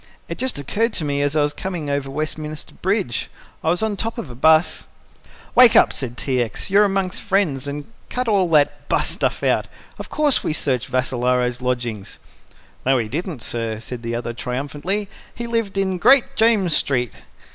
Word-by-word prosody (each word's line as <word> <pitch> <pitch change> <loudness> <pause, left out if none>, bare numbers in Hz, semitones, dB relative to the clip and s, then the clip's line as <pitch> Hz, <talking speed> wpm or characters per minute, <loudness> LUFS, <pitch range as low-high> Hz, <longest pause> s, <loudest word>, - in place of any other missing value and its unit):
"It - - -6
just 260 -1 0
occurred 215 - -1
to 155 - -2
me 140 -1 0
as 145 +1 0
I 150 - +4
was 145 0 0
coming 175 -5 -5
over 140 -1 -2
Westminster 155 +1 -5
Bridge. 190 - -1 0.3
I 160 - +1
was 175 +5 +2
on 220 -2 0
top 225 +4 -3
of 165 - -6
a - - -8
bus 160 +5 +3 0.3
" - - -24
"Wake 240 -2 +8
up!" - - +6
said 120 -3 -5
T. 130 -2 0
X. 115 - -4
"You're 205 +1 +6
amongst 195 -1 -1
friends 185 -10 0
and 145 +1 -5 0.2
cut 250 0 -2
all 195 -5 +2
that 145 -2 +2
'bus' - - +1
stuff - - -1
out. - - +1 0.3
Of - - -7
course 300 -3 +2
we - - -1
searched 130 -5 -1
Vassalaro's 125 -1 0
lodgings!" 120 -5 -3 0.7
"No, 135 0 +3
we 110 -3 -2
didn't, 160 - -4
sir," 115 -2 -1
said 120 +1 -7
the 115 0 -3
other 120 0 -3
triumphantly. 145 - -3 0.3
"He 235 - -5
lived 230 -4 -2
in 190 -2 0
Great 270 +5 +5
James 215 -8 +3
Street." 125 -6 0
150 Hz, 190 wpm, -21 LUFS, 125-195 Hz, 0.7 s, Wake